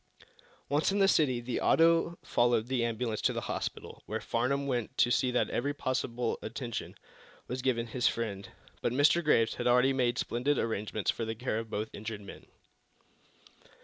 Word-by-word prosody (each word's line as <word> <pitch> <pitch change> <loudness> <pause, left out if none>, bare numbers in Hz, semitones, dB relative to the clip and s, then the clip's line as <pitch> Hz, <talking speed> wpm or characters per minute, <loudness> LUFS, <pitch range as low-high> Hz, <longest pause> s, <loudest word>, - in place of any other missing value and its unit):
Once 150 +6 +1
in 200 - 0
the 195 -1 +5
city 140 -10 +3
the 120 0 -3
auto 165 +1 +4
followed 120 -2 +2
the 125 -1 0
ambulance 115 -1 -2
to - - +2
the - - -3
hospital, - - -5
where - - -2
Farnum 140 +4 -1
went 125 -5 -2
to 120 - +4
see 130 - +2
that 125 - 0
every 145 +4 -1
possible 125 -3 -2
attention 115 +1 -5 0.5
was 125 +1 -4
given 120 -2 0
his 125 +2 0
friend. 100 -4 -3 0.3
But 120 - 0
Mr. 145 +6 +4
Graves 115 -7 +3
had - - -2
already 125 +2 +4
made 120 -2 +1
splendid 125 +5 0
arrangements 110 -2 -1
for - - -5
the 110 0 -3
care 115 -1 -2
of 115 -1 -7
both 105 +2 -4
injured 110 0 -6
men. 100 - -11
120 Hz, 175 wpm, -30 LUFS, 115-135 Hz, 0.5 s, the